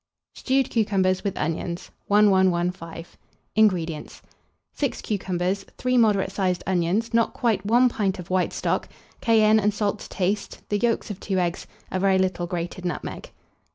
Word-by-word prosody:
STEWED 265 Hz, -1 st, 0 dB
CUCUMBERS 190 Hz, -4 st, +1 dB
WITH 200 Hz, -3 st, -2 dB
ONIONS. 170 Hz, +2 st, -3 dB, 0.2 s
1115. 180 Hz, -5 st, +2 dB, 0.5 s
INGREDIENTS. 175 Hz, -8 st, +1 dB, 0.5 s
6 280 Hz, -3 st, -2 dB
cucumbers, 190 Hz, -2 st, -1 dB
3 255 Hz, 0 st, 0 dB
moderate 210 Hz, -5 st, +3 dB
sized 185 Hz, -2 st, -1 dB
onions, 190 Hz, +5 st, 0 dB
not 230 Hz, 0 st, +2 dB
quite 235 Hz, -4 st, +1 dB
1 240 Hz, +3 st, +5 dB
pint 205 Hz, -5 st, -1 dB
of 180 Hz, -1 st, -9 dB
white 185 Hz, -1 st, +1 dB
stock, -, -, -1 dB, 0.3 s
cayenne 220 Hz, -2 st, +5 dB
and 210 Hz, 0 st, +1 dB
salt 205 Hz, -1 st, -1 dB
to -, -, -10 dB
taste, 195 Hz, +2 st, -2 dB
the 205 Hz, -, +1 dB
yolks 230 Hz, -2 st, 0 dB
of 200 Hz, -, -7 dB
2 195 Hz, -2 st, -2 dB
eggs, 175 Hz, 0 st, -1 dB, 0.2 s
a 185 Hz, -, -1 dB
very 190 Hz, 0 st, +3 dB
little 185 Hz, -2 st, 0 dB
grated 175 Hz, +1 st, -4 dB
nutmeg. 175 Hz, -, -5 dB
195 Hz, 150 wpm, -24 LUFS, 180-215 Hz, 0.5 s, 1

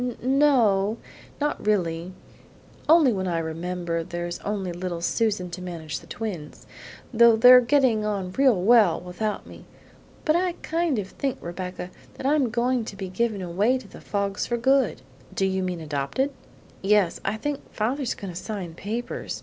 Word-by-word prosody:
"No 270 Hz, -1 st, +4 dB
o; 200 Hz, +3 st, +1 dB, 0.4 s
not 295 Hz, 0 st, -1 dB
really; 175 Hz, -4 st, 0 dB, 0.8 s
only 310 Hz, -6 st, +6 dB
when 190 Hz, -2 st, -2 dB
I 170 Hz, -2 st, 0 dB
remember 165 Hz, +1 st, -3 dB
there's 175 Hz, +1 st, -5 dB
only 200 Hz, -3 st, -3 dB
little 175 Hz, 0 st, -4 dB
Susan 200 Hz, -2 st, 0 dB
to 180 Hz, +2 st, -6 dB
manage 170 Hz, -4 st, -5 dB
the -, -, -17 dB
twins; 185 Hz, -9 st, -6 dB, 0.5 s
though 235 Hz, 0 st, +7 dB
they're 250 Hz, +3 st, +9 dB
getting 245 Hz, -4 st, +3 dB
on 200 Hz, -3 st, -2 dB
real 260 Hz, -2 st, +3 dB
well 210 Hz, -2 st, +5 dB
without 180 Hz, +4 st, -4 dB
me. -, -, -13 dB, 0.6 s
But 310 Hz, -, +3 dB
I 360 Hz, 0 st, +1 dB
kind 330 Hz, -4 st, 0 dB
of 195 Hz, -2 st, -3 dB
think, 270 Hz, +4 st, -3 dB
Rebecca, 180 Hz, +1 st, -6 dB, 0.2 s
that -, -, -8 dB
I'm 280 Hz, -3 st, +3 dB
going 245 Hz, +1 st, +1 dB
to 205 Hz, -, -7 dB
be 190 Hz, -2 st, -5 dB
given 205 Hz, 0 st, -1 dB
away 200 Hz, +9 st, +1 dB
to 255 Hz, -, -11 dB
the -, -, -13 dB
Foggs 200 Hz, -1 st, -2 dB
for 240 Hz, -, 0 dB
good." 255 Hz, -, +2 dB, 0.3 s
"Do 195 Hz, -, +1 dB
you 190 Hz, 0 st, 0 dB
mean 180 Hz, -2 st, -2 dB
adopted?" 150 Hz, -, -2 dB, 0.5 s
"Yes; 200 Hz, -2 st, +2 dB
I 200 Hz, +2 st, -1 dB
think 290 Hz, +5 st, -3 dB
father's 250 Hz, +4 st, -1 dB
going 195 Hz, -3 st, -7 dB
to 170 Hz, -, -5 dB
sign 195 Hz, -6 st, -5 dB
papers. 220 Hz, +8 st, -5 dB
205 Hz, 165 wpm, -25 LUFS, 180-245 Hz, 0.8 s, they're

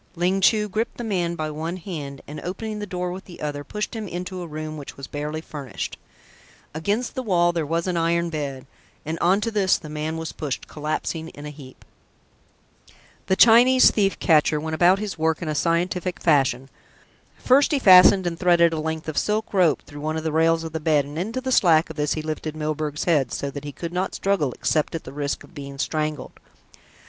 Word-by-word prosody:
Ling 180 Hz, +3 st, +1 dB
Chu 210 Hz, +2 st, +4 dB
gripped 215 Hz, +3 st, -3 dB
the 240 Hz, -, -5 dB
man 180 Hz, -6 st, -1 dB
by 155 Hz, -2 st, -3 dB
one 160 Hz, +4 st, -4 dB
hand 150 Hz, -7 st, -7 dB
and 150 Hz, -, -7 dB
opening 210 Hz, +4 st, -5 dB
the 205 Hz, -, -5 dB
door 180 Hz, -1 st, -3 dB
with 185 Hz, +2 st, -8 dB
the 175 Hz, -, -12 dB
other, 145 Hz, -1 st, -4 dB
pushed 210 Hz, -, -4 dB
him 220 Hz, -2 st, -4 dB
into 180 Hz, +1 st, -5 dB
a 175 Hz, -, -6 dB
room 155 Hz, 0 st, -6 dB
which 145 Hz, -2 st, -9 dB
was 140 Hz, -, -7 dB
barely 150 Hz, +3 st, -4 dB
furnished. 140 Hz, -9 st, -6 dB, 0.8 s
Against 205 Hz, +10 st, -1 dB
the 260 Hz, -, -3 dB
wall 175 Hz, -7 st, +2 dB
there 165 Hz, -3 st, -2 dB
was 165 Hz, +2 st, -1 dB
an 180 Hz, -2 st, -1 dB
iron 170 Hz, 0 st, +1 dB
bed, 140 Hz, -4 st, -4 dB, 0.4 s
and 160 Hz, +2 st, -3 dB
on 190 Hz, +4 st, +3 dB
to 230 Hz, -, -1 dB
this 200 Hz, -3 st, +2 dB
the 155 Hz, -3 st, -10 dB
man 155 Hz, +1 st, -3 dB
was 160 Hz, 0 st, -4 dB
pushed, 145 Hz, -4 st, -5 dB
collapsing 155 Hz, +2 st, -3 dB
in 145 Hz, -2 st, -11 dB
a 150 Hz, -, -6 dB
heap. 135 Hz, -3 st, -14 dB, 1.4 s
The 190 Hz, -, +3 dB
Chinese 245 Hz, +4 st, +7 dB
thief 195 Hz, -2 st, +1 dB
catcher 155 Hz, -2 st, +3 dB
went 160 Hz, +1 st, -4 dB
about 175 Hz, +4 st, +4 dB
his 205 Hz, -4 st, -5 dB
work 160 Hz, 0 st, +1 dB
in 170 Hz, -, -5 dB
a 155 Hz, -, -1 dB
scientific 175 Hz, +3 st, 0 dB
fashion. 135 Hz, -4 st, +2 dB, 0.7 s
First 275 Hz, +4 st, +4 dB
he 295 Hz, -, +3 dB
fastened 190 Hz, -4 st, +7 dB
and 170 Hz, -1 st, -3 dB
threaded 170 Hz, -2 st, +4 dB
a 160 Hz, -, -2 dB
length 160 Hz, 0 st, -4 dB
of 155 Hz, -, 0 dB
silk 215 Hz, +1 st, -1 dB
rope 180 Hz, -6 st, +3 dB
through 145 Hz, 0 st, -10 dB
one 155 Hz, +1 st, -2 dB
of 160 Hz, -, -4 dB
the 160 Hz, -, -1 dB
rails 165 Hz, +1 st, +2 dB
of 160 Hz, -, -6 dB
the 160 Hz, -, -3 dB
bed 150 Hz, -2 st, +2 dB
and 145 Hz, +3 st, -6 dB
into 225 Hz, +8 st, -3 dB
the 260 Hz, 0 st, -3 dB
slack 165 Hz, -8 st, +4 dB
of -, -, -10 dB
this 150 Hz, -1 st, 0 dB
he 155 Hz, -, -4 dB
lifted 155 Hz, 0 st, -4 dB
Milburgh's 155 Hz, -1 st, -3 dB
head, 145 Hz, -8 st, +2 dB
so 140 Hz, -, -3 dB
that 145 Hz, +1 st, -7 dB
he 145 Hz, -, -5 dB
could 170 Hz, +4 st, -6 dB
not 185 Hz, +1 st, -2 dB
struggle 195 Hz, -9 st, 0 dB
except 155 Hz, +1 st, 0 dB
at 165 Hz, -, -5 dB
the -, -, -10 dB
risk 145 Hz, 0 st, -3 dB
of -, -, -17 dB
being 140 Hz, -3 st, -8 dB
strangled. 155 Hz, -1 st, -3 dB
165 Hz, 215 wpm, -23 LUFS, 150-185 Hz, 1.4 s, Chinese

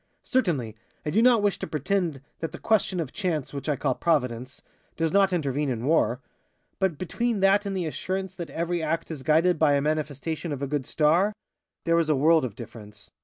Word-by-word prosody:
Certainly, 160 Hz, -, 0 dB, 0.3 s
I 150 Hz, -, -1 dB
do 215 Hz, -, +3 dB
not 240 Hz, -3 st, +5 dB
wish 205 Hz, -2 st, +1 dB
to -, -, -4 dB
pretend 160 Hz, -2 st, -1 dB, 0.2 s
that 165 Hz, -, -3 dB
the -, -, -6 dB
question 205 Hz, -4 st, +1 dB
of 155 Hz, -6 st, -3 dB
chance, 165 Hz, -10 st, -2 dB
which 140 Hz, +2 st, -4 dB
I 150 Hz, -, +2 dB
call 130 Hz, -, 0 dB
Providence, 125 Hz, -5 st, -1 dB, 0.3 s
does 165 Hz, -1 st, +1 dB
not 195 Hz, -1 st, +4 dB
intervene 145 Hz, -4 st, 0 dB
in 120 Hz, -1 st, -2 dB
war. 140 Hz, -4 st, +2 dB, 0.6 s
But 190 Hz, -6 st, +1 dB
between 225 Hz, +6 st, -1 dB
that 200 Hz, +1 st, +4 dB
and 195 Hz, -1 st, -2 dB
the 180 Hz, -, -1 dB
assurance 190 Hz, +6 st, -3 dB
that 175 Hz, -3 st, -7 dB
every 170 Hz, +1 st, -2 dB
act 165 Hz, +1 st, -2 dB
is 150 Hz, -4 st, -6 dB
guided 160 Hz, +6 st, +3 dB
by 150 Hz, -2 st, +4 dB
a -, -, +3 dB
manifestation 155 Hz, +2 st, -2 dB
of 140 Hz, -1 st, -3 dB
a -, -, -1 dB
good 140 Hz, -2 st, -2 dB
star 170 Hz, +7 st, +3 dB, 0.5 s
there 165 Hz, 0 st, +3 dB
is 160 Hz, -2 st, 0 dB
a 155 Hz, -, +4 dB
world 155 Hz, +3 st, +4 dB
of 110 Hz, -5 st, -6 dB
difference. 105 Hz, -3 st, -11 dB
160 Hz, 205 wpm, -26 LUFS, 140-185 Hz, 0.6 s, not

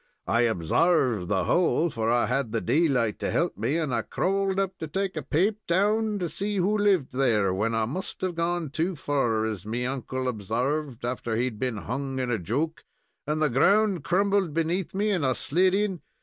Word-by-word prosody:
I 120 Hz, 0 st, +3 dB
obsarved 115 Hz, -, +2 dB
the 95 Hz, -1 st, +1 dB
hole, 170 Hz, -, +2 dB
for 115 Hz, -2 st, -1 dB
I 120 Hz, 0 st, +3 dB
had 125 Hz, -2 st, -1 dB
the 115 Hz, -, 0 dB
daylight 125 Hz, -4 st, +1 dB
to -, -, -2 dB
help 170 Hz, +1 st, 0 dB
me, 150 Hz, -, -1 dB
and 155 Hz, -6 st, -1 dB
I 115 Hz, -, +1 dB
crawled 195 Hz, -, -1 dB
up 195 Hz, -1 st, -2 dB
to 160 Hz, -, -4 dB
take 190 Hz, +4 st, -2 dB
a 155 Hz, -, -2 dB
paap 180 Hz, +10 st, +1 dB
down 210 Hz, +4 st, +2 dB
to 180 Hz, -3 st, -2 dB
see 200 Hz, +6 st, -3 dB
who 195 Hz, +3 st, +2 dB
lived 200 Hz, -9 st, +2 dB
there, 110 Hz, -8 st, +2 dB
when 110 Hz, +4 st, 0 dB
I 110 Hz, -1 st, +1 dB
must 165 Hz, +12 st, -5 dB
have 185 Hz, -1 st, -1 dB
gone 170 Hz, -2 st, -1 dB
too 165 Hz, +5 st, -1 dB
fur, 120 Hz, -7 st, 0 dB
as 105 Hz, -5 st, -4 dB
me 115 Hz, +4 st, -3 dB
uncle 130 Hz, 0 st, -3 dB
obsarved 125 Hz, +4 st, -2 dB
after 120 Hz, -2 st, -2 dB
he 120 Hz, -, +1 dB
had 115 Hz, -5 st, -5 dB
been 125 Hz, -3 st, -1 dB
hung 135 Hz, +5 st, -4 dB
in 125 Hz, -2 st, -1 dB
a 115 Hz, -, 0 dB
joke, 140 Hz, -, -2 dB, 0.4 s
and 155 Hz, +1 st, 0 dB
the -, -, +4 dB
ground 195 Hz, -, +3 dB
crumbled 195 Hz, -2 st, +1 dB
beneath 170 Hz, +3 st, -1 dB
me, 210 Hz, +2 st, +1 dB
and 180 Hz, -6 st, 0 dB
I 130 Hz, -1 st, +2 dB
slid 185 Hz, +5 st, +2 dB
in. 195 Hz, -4 st, -1 dB
145 Hz, 205 wpm, -26 LUFS, 120-185 Hz, 0.4 s, the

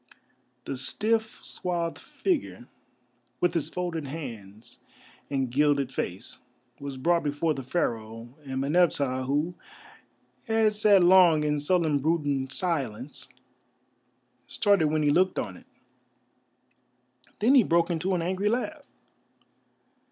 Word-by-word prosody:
The 135 Hz, -, -4 dB
stiff, 220 Hz, -, -1 dB
swathed 170 Hz, -2 st, -3 dB
figure, 355 Hz, -7 st, -3 dB, 0.7 s
with 175 Hz, -, +1 dB
its 160 Hz, -2 st, -1 dB
folded 170 Hz, -4 st, -4 dB
hands 115 Hz, -7 st, -8 dB, 0.5 s
and 135 Hz, -3 st, -1 dB
gilded 140 Hz, -1 st, +2 dB
face, 90 Hz, -4 st, -5 dB, 0.4 s
was 140 Hz, -1 st, -6 dB
brought 170 Hz, +5 st, +2 dB
before 150 Hz, +2 st, 0 dB
the 135 Hz, -, -5 dB
Pharaoh, 115 Hz, -5 st, -3 dB
and 130 Hz, -1 st, -4 dB
Meneptah, 140 Hz, -4 st, +1 dB
who 150 Hz, +6 st, 0 dB, 0.9 s
had 220 Hz, -2 st, +2 dB
sat 205 Hz, -3 st, +5 dB
long 175 Hz, -4 st, +6 dB
in 150 Hz, 0 st, 0 dB
sullen 155 Hz, -1 st, +1 dB
brooding 145 Hz, -3 st, 0 dB
silence, 135 Hz, -, -3 dB, 1.2 s
started 200 Hz, -7 st, +2 dB
when 155 Hz, 0 st, 0 dB
he 145 Hz, -, +3 dB
looked 185 Hz, +5 st, +2 dB
on 95 Hz, -, -3 dB
it. -, -, -16 dB, 1.7 s
Then 230 Hz, +6 st, +4 dB
he 270 Hz, -, +8 dB
broke 170 Hz, -3 st, +2 dB
into 180 Hz, +3 st, 0 dB
an 170 Hz, -, -1 dB
angry 190 Hz, +4 st, 0 dB
laugh. 270 Hz, +6 st, -2 dB
155 Hz, 115 wpm, -27 LUFS, 135-180 Hz, 1.7 s, he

